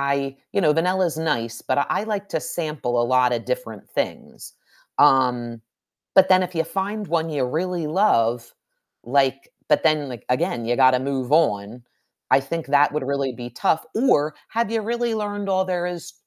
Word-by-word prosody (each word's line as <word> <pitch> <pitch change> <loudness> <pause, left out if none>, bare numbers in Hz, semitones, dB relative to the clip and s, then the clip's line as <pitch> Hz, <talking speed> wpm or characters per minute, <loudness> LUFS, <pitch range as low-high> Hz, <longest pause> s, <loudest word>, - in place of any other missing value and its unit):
I 135 -1 -4 0.2
you 200 - +1
know, 150 -4 +4
vanilla 180 +3 +1
is 165 -2 -3
nice, 120 -8 -2
but 130 - -1
I 140 - +1
I - - 0
like 205 -2 -4
to 160 - -1
sample 150 -5 -2
a - - +1
lotta 125 -1 +2
different - - -5
things, - - -5 0.4
um, 125 -4 +3 0.5
but 190 0 +6
then, 185 0 +5
if 180 0 -5
you 165 - +1
find 200 +5 -3
one 165 -1 0
you 145 -3 -1
really 170 +4 -2
love, 120 - +1 0.5
like 135 +2 +1 0.2
but - - +3
then, 155 -3 +2
like, 120 -4 -9
again, 120 -2 -1
you 120 +1 0
gotta 130 -1 +5
move 135 -1 -3
on, 115 -7 +1 0.5
I - - +5
think 160 +4 -5
that 145 +1 +3
would 150 - -2
really 140 -1 -1
be 120 0 -8
tough. 160 - 0
Or 155 - +2
have 230 -1 -1
you 225 -1 -1
really 235 +1 -1
learned 205 -2 -3
all 190 -1 +2
there 180 -1 -2
is 175 -3 -6
150 Hz, 185 wpm, -22 LUFS, 130-185 Hz, 0.5 s, but